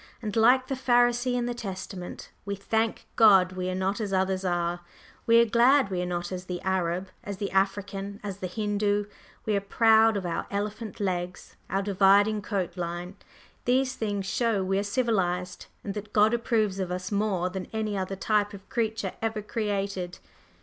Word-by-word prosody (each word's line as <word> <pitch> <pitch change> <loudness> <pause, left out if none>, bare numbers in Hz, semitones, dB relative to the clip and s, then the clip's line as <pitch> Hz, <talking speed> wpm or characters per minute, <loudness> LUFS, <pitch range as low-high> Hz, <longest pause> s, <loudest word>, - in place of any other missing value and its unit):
And, 215 -4 -5
like 250 +3 +5
the 270 - -3
Pharisee 245 -1 +2
in 245 -1 0
the 245 - -2
Testament, 190 -4 -7
we 200 0 -3
thank 220 +3 -1
God 195 -5 +6
we 185 0 -3
are 185 - -2
not 195 +4 -1
as 205 -2 -3
others 190 0 0
are. 175 -1 0 0.5
We 230 0 +7
are 235 - +6
glad 235 0 +4
we 180 -1 -1
are 180 - -2
not 175 0 -3
as 185 0 -5
the 180 -1 -4
Arab, 185 0 -1
as 200 -1 -5
the 200 0 -3
African, 195 +1 -1
as 200 -2 -5
the 185 - -4
Hindoo; 205 +1 0 0.4
we 215 - +1
are 200 - +1
proud 220 +1 +4
of 190 - -4
our 170 - -2
elephant 210 +1 -4
legs 180 -2 -3
and - - -3
our 195 - +1
dividing 200 +2 +4
coat 195 -4 -3
line; 175 +2 -4 0.5
these 255 +1 +2
things 205 -5 -2
show 225 -1 0
we 195 +1 0
are - - +1
civilized, 195 -5 -1 0.2
and 200 - -4
that 210 0 -7
God 215 +2 +4
approves 220 -4 +1
of 185 -2 -2
us 180 +1 -4
more 200 -3 0
than 185 -1 -5
any 215 -2 -2
other 190 0 -2
type 205 +1 0
of 195 0 -13
creature 220 -5 -1
ever 220 -2 -2
created. 200 -4 -2
200 Hz, 185 wpm, -27 LUFS, 185-220 Hz, 0.5 s, We